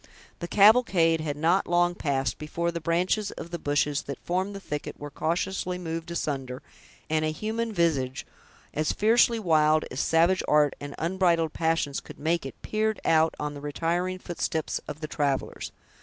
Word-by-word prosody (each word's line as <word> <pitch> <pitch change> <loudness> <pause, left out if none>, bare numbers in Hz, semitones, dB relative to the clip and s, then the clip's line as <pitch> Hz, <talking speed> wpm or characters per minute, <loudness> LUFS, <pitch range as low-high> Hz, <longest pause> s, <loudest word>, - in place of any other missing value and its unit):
The 170 - -4
cavalcade 190 -6 +5
had 145 -2 -3
not 170 +5 +2
long 175 0 +3
passed, 135 -5 -1
before 170 +3 -2
the 170 0 -5
branches 180 +6 +1
of 170 - -8
the 170 - -4
bushes 145 -1 0
that 140 - -4
formed 185 +3 -1
the - - -5
thicket 150 -6 -6
were 145 0 -7
cautiously 180 +4 -2
moved 165 -1 -5
asunder, 135 -6 -3 0.4
and 155 0 +1
a 155 - +1
human 220 +7 -3
visage, 145 -9 0 0.5
as 155 0 0
fiercely 230 +2 +4
wild 155 -6 +3
as 130 - -4
savage 170 +5 +3
art 150 -1 +3
and 145 0 -7
unbridled 170 -2 +1
passions 160 -4 0
could - - -12
make 160 -1 0
it, - - -11
peered 215 0 0
out 160 0 +3
on 150 0 -3
the 145 - -9
retiring 170 +5 -1
footsteps 165 -3 -3
of 150 - -7
the 155 - -3
travelers. 140 -3 -2
165 Hz, 170 wpm, -27 LUFS, 150-180 Hz, 0.5 s, cavalcade